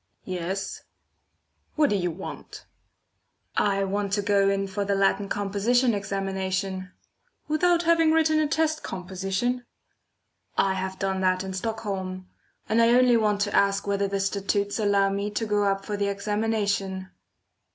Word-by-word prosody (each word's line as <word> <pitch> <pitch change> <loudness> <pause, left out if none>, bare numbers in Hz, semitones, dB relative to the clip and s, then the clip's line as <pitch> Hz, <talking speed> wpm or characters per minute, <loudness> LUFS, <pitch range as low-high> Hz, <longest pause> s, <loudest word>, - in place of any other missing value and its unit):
"Yes." 185 +1 -4 0.9
"What 300 -5 +3
do - - +2
you 180 -3 0
want?" 175 +3 -8 0.9
"I 195 -1 +2
want 200 +1 -1
to 205 0 +1
go 200 -1 +3
in 195 0 0
for 195 +1 -3
the 200 0 0
Latin 195 0 +1
Composition 215 +5 +1
examination." 190 -1 -2 0.6
"Without 345 +3 +2
having 330 -1 +4
written 315 -1 +3
a 305 - +2
test 315 0 0
composition?" 195 +7 -2 0.9
"I 195 -1 +3
have 190 0 -4
done 190 -1 -1
that 185 0 +2
in 190 0 -5
Stockholm 190 -3 -4 0.4
and 220 +3 +3
I 230 +1 +5
only 250 -1 +5
want 210 -2 +2
to 205 0 0
ask 200 0 +2
whether 200 0 0
the 195 0 -2
statutes 200 +1 -1
allow 200 -2 +3
me 200 +1 -2
to 225 +2 -2
go 210 -1 +1
up 195 0 0
for 210 - -3
the 200 0 0
examination." 200 -2 -1
200 Hz, 150 wpm, -26 LUFS, 195-220 Hz, 0.9 s, I